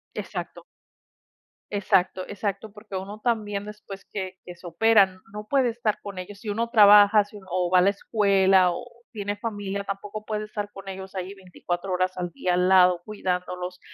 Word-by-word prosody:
Exacto. - - -6 1.1
Exacto 190 -2 +1
exacto, 205 +1 -4
porque 210 -2 -10
uno 195 +3 -6
también 210 -4 -1
después 210 -2 -10
que 190 -2 -5
que 180 -1 -10
se 175 - -17
operan, 190 +1 +3
no 210 0 -7
puede 265 -2 +2
estar 225 -2 -2
con 200 -2 -8
ellos. 195 +2 -8
Si 215 - -7
uno 230 +3 -1
trabaja, 210 -2 +7
si 205 +1 -13
uno 195 - -14
o 180 0 0
va 185 - +5
a - - +5
la 200 - +4
escuela 195 -3 +3
o 175 - -6 0.3
tiene 205 -3 -3
familia, 205 -3 -4
tampoco 205 +2 -6
puede 215 -1 -3
estar 205 -1 -5
con 195 -1 -12
ellos 190 0 -8
ahí 190 0 -5
24 185 0 -5
horas 185 0 0
al 175 -1 -3
día, 185 -10 -1
al 180 +1 +2
lado 180 -2 +5
cuidándolos, 180 -3 -4
200 Hz, 180 wpm, -25 LUFS, 185-210 Hz, 1.1 s, trabaja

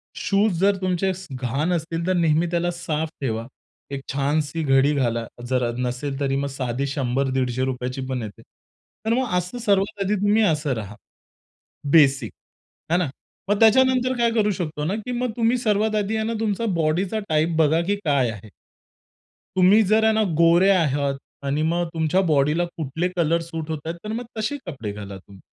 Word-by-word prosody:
Shoes 200 -3 +1
जर 200 +1 +4
तुमचे 185 +1 0
स 185 +1 -10
घाण 135 +6 -1
असतील, 165 0 -2
तर 185 - +2
नेहमी 165 -1 +2
त्याला 175 0 0
साफ 160 -2 -3
ठेवा. 115 -2 -2 0.4
एक 140 -1 -4
छानशी 145 +3 0
घडी 135 +1 +3
घाला 115 -3 0 0.2
जर 125 -2 +1
नसेल 125 +3 -3
तरी, 135 -1 0
मग 140 +1 -1
साधी 130 +1 -2
₹100-₹150 130 -1 -1
रुपयाची 130 0 -3
पण 130 -2 -2
येते. 105 -3 -9 0.6
तर 225 - +2
मग 255 0 0
असं 180 +7 -3
सर्वात 200 -1 +1
आधी 200 +2 +1
तुम्ही 210 +2 +3
असं 150 -6 +1
राहा. 105 -2 -6 1.0
बेसिक. 140 -4 +4 0.6
हे - - +5
ना. 170 -6 0 0.4
मग 205 0 +2
त्याच्यानंतर 255 +2 +4
काय 235 -1 +3
करू 215 -2 +2
शकतो 155 -5 -4
ना, 185 +6 -1
की 235 +3 -5
मग 245 0 -1
तुम्ही 235 +1 +2
सर्वात 215 -1 +1
आधी 210 +1 0
आहे 220 - -1
ना, 230 - -2
तुमचा 220 +1 -1
बॉडीचा 170 +6 0
टाइप 160 +1 +1
बघा 160 +1 +4
की 205 +1 +1
काय 140 -6 +2
आहे. 105 0 -10 1.1
तुम्ही 190 +4 +6
जर 215 +3 +3
आहे 220 - +4
ना, 220 - +2 0.2
गोरे 170 +3 +5
आहात 145 -6 +2 0.3
आणि 145 +2 0
मग 170 +2 +1
तुमच्या 160 +4 +1
बॉडीला 155 0 +2
कुठले 160 +3 -2
कलर 170 -1 +2
सूट 165 -1 -6
होताहेत 160 +2 -4
तर 215 - -5
मग 240 +2 -4
तसे 285 +7 -2
कपडे 130 - -5
घाला 100 -1 -8
तुम्ही. 95 +1 -16
165 Hz, 175 wpm, -23 LUFS, 135-200 Hz, 1.1 s, तुम्ही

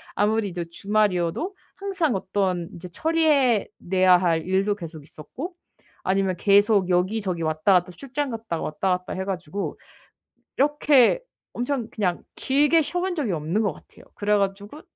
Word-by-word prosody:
아무리 210 +1 +1
이제 175 -1 -4
주말이어도 205 - 0 0.2
항상 370 - -1
어떤 185 -3 -1
이제 175 +1 -8
처리해 295 - +2
내야 185 0 +4
할 170 -3 +1
일도 195 +2 +1
계속 165 -5 -9
있었고 265 - -8 0.5
아니면 190 -1 +1
계속 200 0 +4
여기저기 185 0 0
왔다 155 +4 +2
갔다 180 0 +2
출장 275 +7 -4
갔다 225 -8 -4
왔다 185 +3 0
갔다 180 +1 -8
해 190 0 -3
가지고 190 0 -4 0.8
이렇게 295 - +4 0.3
엄청 245 -2 -2
그냥 185 -5 -1
길게 295 +4 +3
쉬어 355 +4 -2
본 370 0 -1
적이 280 - -1
없는 165 +6 -1
것 205 -4 0
같아요. - - -18
그래 210 0 +1
가지고 200 +8 -3
200 Hz, 315 characters per minute, -24 LUFS, 180-260 Hz, 0.8 s, 내야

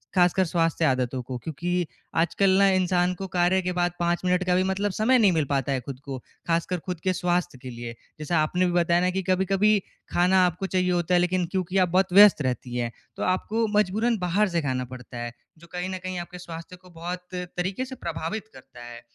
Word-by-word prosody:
ख़ासकर 180 +1 +4
स्वास्थ्य 165 -1 +1
आदतों 130 -1 0
को। 125 +1 -6
क्योंकि 170 +5 -2 0.3
आजकल 180 +4 +2
ना 200 - +6
इंसान 180 -1 +2
को 190 +1 -6
कार्य 180 +1 +2
के 180 0 -2
बाद 175 0 +2
5 175 0 +1
मिनट 180 0 +2
का 180 - +3
भी 185 - +3
मतलब 195 +2 -1
समय 220 +7 +3
नहीं 205 -4 +5
मिल 155 -3 +1
पाता 140 -1 -1
है 135 - 0
खुद 130 +1 -8
को, 135 -2 -5 0.3
ख़ासकर 170 +2 0
खुद 180 -3 -4
के 185 -1 +2
स्वास्थ्य 175 -4 -1
के 130 - -7
लिए। 120 -1 -7 0.2
जैसा 155 +2 -1
आपने 180 +4 +1
भी 175 - +1
बताया 175 0 +3
ना 180 - +2
कि 190 0 -2
कभी-कभी 195 +3 +3 0.3
खाना 180 +1 +4
आपको 180 +2 -2
चाहिए 185 -1 +1
होता 175 0 0
है 175 - +5
लेकिन 180 0 +1
क्योंकि 185 0 -2
आप 185 -2 +3
बहुत 185 +1 +2
व्यस्त 205 -4 +8
रहती 125 -2 -3
हैं, 120 -1 -1 0.2
तो - - -4
आपको 215 +5 0
मजबूरन 215 +4 +2
बाहर 185 +4 +2
से 170 -1 0
खाना 130 -3 -2
पड़ता 125 -1 -9
है। 120 0 -4 0.3
जो 170 +1 -16
कहीं 180 +1 -3
न 185 - -3
कहीं 185 0 -4
आपके 175 +1 -8
स्वास्थ्य 165 0 -9
को 180 0 -19
बहुत 175 +1 -6
तरीके 180 +6 -3
से 260 0 -8
प्रभावित 215 +1 -4
करता 120 - -14
है। 120 0 -10
180 Hz, 220 wpm, -25 LUFS, 165-185 Hz, 0.3 s, व्यस्त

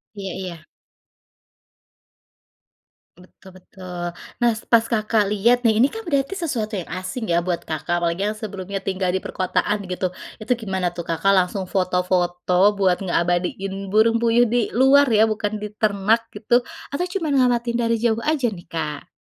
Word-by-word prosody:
Iya 195 -2 -5
iya. 185 -2 -5 2.6
Betul 185 0 -17
betul. 180 -2 -7 0.3
Nas 230 -2 +1
pas 230 -1 +5
Kakak 215 -2 +1
lihat 235 +4 +3
nih, 220 -2 +3
ini 255 - +6
kan 445 +9 -6
berarti 285 0 -1
sesuatu 235 - -3
yang 180 -4 -5
asing 200 +3 -5
ya 170 - +3
buat 175 -2 -1
Kakak, 160 +2 -3
apalagi 170 +4 0
yang 210 - -1
sebelumnya 200 -2 -6
tinggal 190 -1 -1
di 190 - -1
perkotaan 200 +2 -1
gitu, 185 0 -2 0.3
itu 235 +4 -1
gimana 190 -5 -2
tuh 170 -1 -7
Kakak 165 +4 +1
langsung 190 0 +2
foto-foto 180 +1 +2
buat 190 -3 +2
ngeabadiin 190 +2 -1
burung 220 +3 +3
puyuh 235 0 +3
di 240 -1 +2
luar 270 +3 +6
ya, 220 +1 +4
bukan 210 0 -3
di 210 - -4
ternak 215 +2 +2
gitu, 240 +2 +2 0.3
atau 350 +6 -2
cuman 310 -7 0
ngamatin 240 -2 +2
dari 230 -1 +1
jauh 230 -1 +2
aja 280 -3 0
nih 175 -5 -10
Kak? 150 -3 -4
205 Hz, 155 wpm, -22 LUFS, 185-230 Hz, 2.6 s, ini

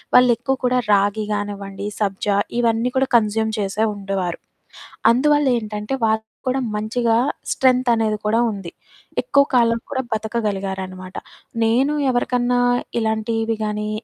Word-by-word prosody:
వాళ్ళు 250 -1 +7
ఎక్కువ 265 +3 -1
కూడా 250 0 +3
రాగి 205 +2 +2
గానివ్వండి, 200 -1 -4
సబ్జా 200 0 0 0.2
ఇవన్నీ 230 +1 +1
కూడా 265 0 +2
కన్జ్యూమ్ 220 0 0
చేసే 200 +3 0
ఉండేవారు. 195 -3 -3 0.7
అందువల్ల 290 +4 +3
ఏంటంటే, 210 +2 -5
వాళ్ళకి 220 0 0 0.2
కూడా 260 +1 +1 0.2
మంచిగా 225 +2 0 0.3
స్ట్రెంత్ 255 -1 +2
అనేది 220 -2 +1
కూడా 215 +2 +2
ఉంది. 195 -4 -7 0.5
ఎక్కువ 280 -12 +4
కాలం 230 -2 +3
కూడా 260 - -1
బతకగలిగారనమాట. 195 -4 -3 0.5
నేను 255 +6 +2 0.2
ఎవరికన్నా 245 0 +1 0.4
ఇలాంటివి 225 0 -1
గానీ, 210 0 -2
220 Hz, 120 wpm, -21 LUFS, 205-245 Hz, 0.7 s, వాళ్ళు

